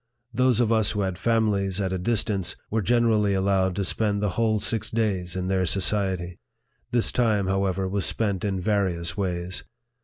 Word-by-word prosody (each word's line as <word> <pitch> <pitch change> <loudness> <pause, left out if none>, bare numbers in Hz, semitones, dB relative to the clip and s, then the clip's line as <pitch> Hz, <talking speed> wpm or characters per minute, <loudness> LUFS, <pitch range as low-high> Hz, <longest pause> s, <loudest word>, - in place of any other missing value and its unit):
Those 125 0 +3
of 115 -2 +2
us 110 -2 +3
who 105 - -1
had 95 -1 -1
fami 115 0 +2
lies 100 -1 -1
at 95 -2 -1
a 95 - -2
distance, 100 -3 -1 0.2
were 110 +1 +1
generally 110 -2 +2
allowed 95 -1 +1
to 100 - -1
spend 100 +1 0
the 105 0 0
whole 110 0 +1
six 110 +1 0
days 100 -6 -1
in 90 0 -2
their 95 -1 +1
society. 95 -1 0 0.5
This 120 -2 +2
time, 110 -5 +1
however, 95 0 0
was 100 0 -2
spent 100 -5 -1
in 100 -3 -1
various 90 -4 -1
ways. 90 -2 -3
100 Hz, 180 wpm, -25 LUFS, 95-110 Hz, 0.5 s, Those